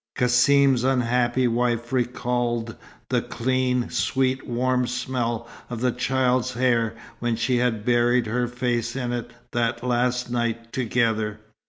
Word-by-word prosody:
Cassim's 130 +1 +4
unhappy 125 -1 +2
wife 120 0 0
recalled 120 -2 -1 0.3
the - - +2
clean, 125 0 0
sweet, 130 0 0
warm 125 +1 +1
smell 120 -2 -2 0.2
of 120 -2 -4
the 125 +1 +1
child's 130 0 +1
hair 120 -2 +1 0.2
when 120 -1 0
she 120 +2 +1
had 115 -3 0
buried 120 0 +3
her 120 +3 0
face 120 -1 -2
in 125 -2 -2
it 120 -1 -4 0.2
that 120 0 -1
last 125 0 0
night 115 -1 -2
together. 110 -4 0
120 Hz, 130 wpm, -24 LUFS, 120-125 Hz, 0.3 s, Cassim's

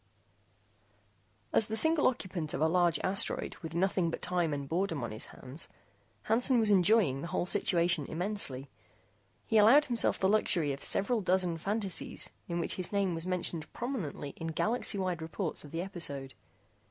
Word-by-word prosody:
As 215 - +4
the 220 0 -2
single 320 +3 +3
occupant 185 -10 -2
of - - -3
a 160 - +4
large 175 0 +3
asteroid 195 +1 0
with 160 -1 -7
nothing 185 -1 +1
but - - -4
time 175 -3 0
and 140 -1 -3
boredom 165 -3 -1
on 115 - -4
his 110 - -4
hands, 135 +5 -6 0.5
Hansen 245 +3 +3
was 220 -2 +3
enjoying 185 - +4
the 170 - -5
whole 175 0 -1
situation 175 -5 +1
immensely. 160 -7 -4 0.7
He 225 - +3
allowed 255 +8 +7
himself 240 -2 +1
the 190 - +1
luxury 175 -7 +2
of 135 - -7
several 225 +3 +2
dozen 180 -3 0
fantasies 200 +1 -1 0.2
in 170 0 -2
which - - -2
his 185 - -4
name 200 -3 +1
was 165 +2 -4
mentioned 175 -4 -2
prominently 200 - -4
in 165 - -5
galaxy 210 +7 0
wide 180 -3 -2
reports 165 +2 -2
of 145 - -11
the 165 +3 -3
episode. 140 -8 -4
180 Hz, 165 wpm, -31 LUFS, 160-205 Hz, 0.7 s, allowed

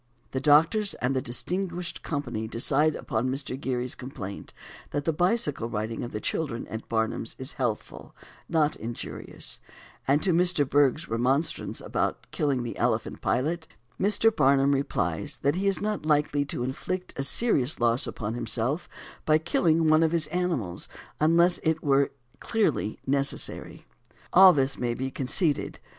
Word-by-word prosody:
The 130 - -1
doctors 165 +9 +4
and 130 +2 -1
the 130 - +1
distinguished 175 +7 -3
company 120 -7 -3
decide 145 +7 +2
upon 120 -1 -2
Mr. 135 0 -2
Gerry's 125 -2 -3
complaint 125 -7 -8 0.4
that 145 0 -3
the 165 - +1
bicycle 155 - +1
riding 110 +1 -3
of 120 - -6
the 105 - -4
children 120 -1 -3
at 110 0 -7
Barnum's 110 0 -1
is 130 +3 -4
healthful 120 -6 -4
and - - -21
not 155 -2 +2
injurious; 115 +2 -6 0.5
and 145 +3 +3
to 185 - +3
Mr. 175 -4 +3
Bergh's 145 +3 +2
remonstrance 130 +7 -1
about - - -2
killing 140 -5 0
the 120 - -5
elephant 115 -2 -1
Pilot, 160 +6 -1 0.3
Mr. 210 +3 +3
Barnum 135 -4 +4
replies 140 +1 -1
that 140 +1 +3
he 190 +4 -1
is 195 - +1
not 210 -3 -2
likely 150 -2 +1
to 130 -3 -3
inflict 180 +8 -4
a - - -3
serious 140 - +2
loss 120 +1 +3
upon 110 0 -4
himself 120 +6 -2 0.3
by 155 0 +4
killing 160 0 +2
one 155 +1 +5
of 165 0 +2
his 165 -3 +2
animals 160 - -2 0.3
unless 170 +3 +4
it 160 -1 0
were 140 -1 +3 0.3
clearly 215 - 0
necessary. 140 0 -1 0.5
All 190 +1 +9
this 135 -4 0
may 120 -1 -1
be 130 +2 -3
conceded. 140 +4 0
140 Hz, 150 wpm, -27 LUFS, 125-165 Hz, 0.5 s, All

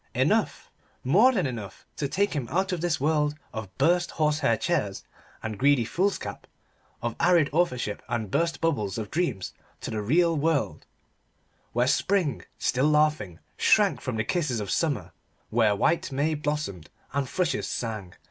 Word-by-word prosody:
Enough, - - +1 0.3
more 200 - +5
than 195 - 0
enough, 115 -6 -6
to 140 - -1
take 200 +7 0
him 140 -6 -2
out 190 +3 0
of 180 -3 -2
this 170 -3 0
world 150 +1 +1 0.2
of 110 -4 -7
burst 170 +5 +3
horsehair 150 -2 +1
chairs 105 - -1 0.4
and 110 -2 -4
greedy 140 -4 +4
foolscap, 190 - -2 0.6
of 120 -1 -2
arid 170 -5 +4
authorship 125 -11 0
and 110 -4 -2
burst 165 0 0
bubbles 115 -12 0
of 110 -2 -5
dreams 135 - -1 0.3
to - - -5
the 110 - -2
real 165 +10 +3
world, 150 -1 0 0.9
where 120 +1 +2
spring, 155 - +1 0.2
still 130 +3 +1
laughing, 150 - +2 0.2
shrank - - +3
from - - -3
the 110 - +1
kisses 150 -6 -1
of 105 -2 -4
summer, 125 - 0 0.4
where 110 -2 +3
white 155 +10 +1
may 145 +4 +1
blossomed 150 - -3 0.2
and 140 -2 -1
thrushes 180 +1 -1
sang. 105 -6 -4
145 Hz, 155 wpm, -26 LUFS, 110-165 Hz, 0.9 s, more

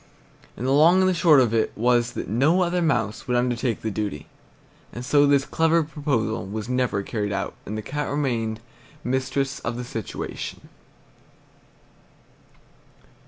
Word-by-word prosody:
And 120 - -4
the 130 - +1
long 165 +6 +6
and 185 - +4
the 185 - +3
short 165 -5 +5
of 120 -4 +2
it 115 -1 +1
was 120 +1 +2
that - - -5
no 145 - +3
other 175 0 0
mouse 120 - 0
would 125 -1 +1
undertake 120 -1 -1
the 110 - -1
duty; 100 -7 -4 0.7
and 120 +1 -7
so 145 +1 +4
this 140 -1 +3
clever 165 0 +2
proposal 145 - -2
was 110 +2 -5
never 125 -5 0
carried 105 -1 -3
out, 95 -1 -2
and 105 +3 -4
the 110 - -5
Cat 145 +5 -3
remained 115 -6 -1 0.4
mistress 130 +2 -1
of 115 +1 -4
the 125 - -4
situation. 115 -4 -6
125 Hz, 155 wpm, -24 LUFS, 110-145 Hz, 0.7 s, long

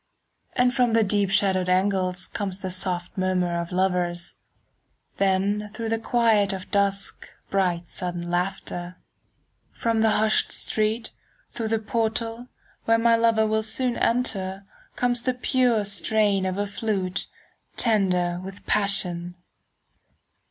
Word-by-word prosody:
And 250 -1 +3
from 245 -2 +2
the 225 0 +5
deep 205 -1 +1
shadowed 190 -2 +2
angles 185 -1 +1
Comes 195 -3 -3
the 185 - -3
soft 180 -1 -3
murmur 180 -2 +1
of 170 - -7
lovers, 180 -2 0 0.9
10 195 +1 +2
Then 210 0 -7
through 225 +2 -5
the 225 0 0
quiet 220 -4 +3
of 185 -1 -7
dusk 200 -1 -1 0.2
Bright 180 -3 0
sudden 175 -1 -4
laughter. 175 0 -3 0.8
From 230 -1 0
the 220 - +4
hushed 215 0 +2
street, 220 +2 -1 0.4
through 225 - -2
the 225 +1 +1
portal, 225 +2 -2 0.4
Where 230 0 +4
soon 230 - -2
my 230 -1 +6
lover 230 -1 +3
will 220 0 +1 0.2
enter, 230 -6 0 0.3
Comes 245 -1 +1
the 255 0 -1
pure 250 -4 +2
strain 200 0 +1
of 185 0 -2
a 205 - 0
flute 200 -3 -2 0.5
15 - - -32
Tender 180 -6 +2
with 195 +1 -9
passion. 180 -4 0
200 Hz, 135 wpm, -25 LUFS, 185-225 Hz, 0.9 s, my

